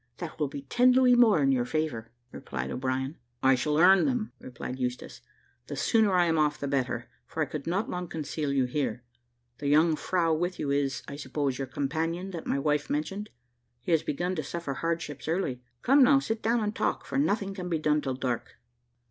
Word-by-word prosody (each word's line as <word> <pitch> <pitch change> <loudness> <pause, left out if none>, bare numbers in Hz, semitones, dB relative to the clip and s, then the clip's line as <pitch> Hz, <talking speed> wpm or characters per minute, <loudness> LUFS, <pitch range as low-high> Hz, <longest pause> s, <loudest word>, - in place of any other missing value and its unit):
That 170 -3 -7
will 150 - +1
be 140 0 -7
ten 250 - +4
louis 255 -1 +5
more 225 -10 +5
in 135 - +4
your 125 -2 +2
favour," 125 -5 -2 0.2
replied 65 0 -5
O'Brien. 130 +3 -2 0.3
"I 135 0 +6
shall 150 +4 0
earn 185 +3 +6
them," 245 -5 -1
replied 125 +1 -7
Eustache: 125 -1 -4 0.5
"the - - -5
sooner 220 -3 +3
I 175 -1 +5
am 165 -1 +2
off 150 0 +2
the 140 - -4
better, 125 -3 -1 0.2
for 160 - -1
I - - -1
could 145 +1 -6
not 190 +6 0
long 180 0 -4
conceal 155 -2 -3
you 135 -2 +2
here. 125 -3 -2 0.6
The 145 - -3
young 155 +3 +4
frow 165 0 +1
with 175 +3 -1
you 140 - -2
is, 140 -3 0
I 140 - -7
suppose, 140 -3 -2
your 135 - -2
companion 165 +7 -2
that 170 -3 -6
my - - +1
wife 150 +1 0
mentioned. 195 +8 -2 0.5
He - - -3
has 165 -2 +4
begun 175 +5 -2
to 155 - -1
suffer 165 -1 -4
hardships 165 -2 -3
early. 160 -7 -1 0.2
Come, 275 +3 +5
now 275 +2 +7
sit 225 -5 -2
down 230 +1 +2
and 210 0 -2
talk, - - -1
for 275 - -1
nothing 205 -8 0
can 180 -2 -5
be 165 - +1
done 150 -1 +1
till 135 -2 -2
dark." 125 -2 -3
155 Hz, 205 wpm, -28 LUFS, 135-180 Hz, 0.6 s, now